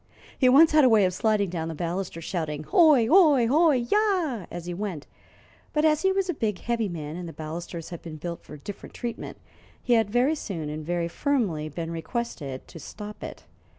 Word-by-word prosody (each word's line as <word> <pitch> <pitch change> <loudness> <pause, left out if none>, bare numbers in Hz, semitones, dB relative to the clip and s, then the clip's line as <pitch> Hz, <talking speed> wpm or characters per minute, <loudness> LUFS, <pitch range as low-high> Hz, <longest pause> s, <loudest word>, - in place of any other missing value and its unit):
He 255 - +4
once 300 +5 +7
had 305 -1 +5
a 255 - +6
way 215 -4 +5
of 185 - 0
sliding 210 -2 +1
down 165 -2 -3
the 165 - -5
balusters, 170 0 -4
shouting: 155 -5 -3
"Ho! 310 - +6
ho! 275 0 +5
ho! 315 +7 +4
yah!" 300 - +1
as 175 -1 -7
he 175 - -4
went, 180 -5 -5 0.7
but 300 0 +2
as 305 -1 +3
he 380 - +3
was 385 -1 0
a 355 - 0
big, 215 - -2
heavy 230 -1 -1
man, 155 -3 -6
and 175 -1 -6
the - - -9
balusters 165 +1 -6
had 170 -2 -8
been 160 -2 -8
built 170 +2 -6
for 150 - -11
different 200 +7 -9
treatment, 235 -1 -5 0.4
he 245 - +1
had 225 -3 +3
very 245 +7 +2
soon 175 - -5
and 155 +1 -5
very 170 +1 -1
firmly 185 - -1
been 165 +2 -5
requested 165 - -5
to 165 - -11
stop 210 +5 -9
it. - - -8
205 Hz, 205 wpm, -26 LUFS, 165-260 Hz, 0.7 s, once